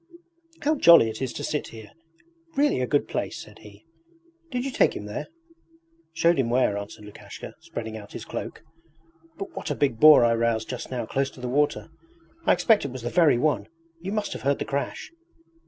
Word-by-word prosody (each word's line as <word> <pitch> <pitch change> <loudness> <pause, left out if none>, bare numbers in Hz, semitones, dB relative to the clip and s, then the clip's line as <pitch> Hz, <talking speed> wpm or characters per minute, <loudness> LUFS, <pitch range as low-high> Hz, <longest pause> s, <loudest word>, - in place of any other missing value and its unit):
'How 300 +2 +3
jolly 170 - +7
it 110 - -9
is 130 -2 -2
to - - -6
sit 150 - -2
here! 110 -2 -12 0.6
It's 325 - -25
really 285 - +2
a 125 - 0
good 145 +2 +1
place,' - - -3
said - - -12
he. 105 0 -15 0.6
'Did 250 -2 -3
you 275 - -2
take - - +2
him 105 - -6
there?' 105 - -5 0.8
'Showed 165 0 +2
him 120 -3 +1
where,' 120 -4 +2
answered 100 +1 -7
Lukashka, 105 - -10
spreading 110 -1 -7
out 100 -2 -12
his - - -7
cloak. - - -6 0.7
'But 195 - -7
what - - -5
a 145 - -1
big 135 -6 0
boar 150 -4 +8
I 115 - +3
roused 115 -1 0
just 125 - -5
now 125 -3 -3
close 135 +4 -1
to - - -16
the 125 - -4
water! 145 +5 0 0.6
I - - +6
expect 220 -3 +3
it 140 - -4
was 130 -2 -8
the 120 - -3
very 165 -8 +4
one! 120 -7 0 0.3
You 185 +4 -5
must 210 -1 -2
have - - -7
heard 140 +1 +1
the - - -4
crash?' 140 - -4
130 Hz, 205 wpm, -25 LUFS, 115-165 Hz, 0.8 s, boar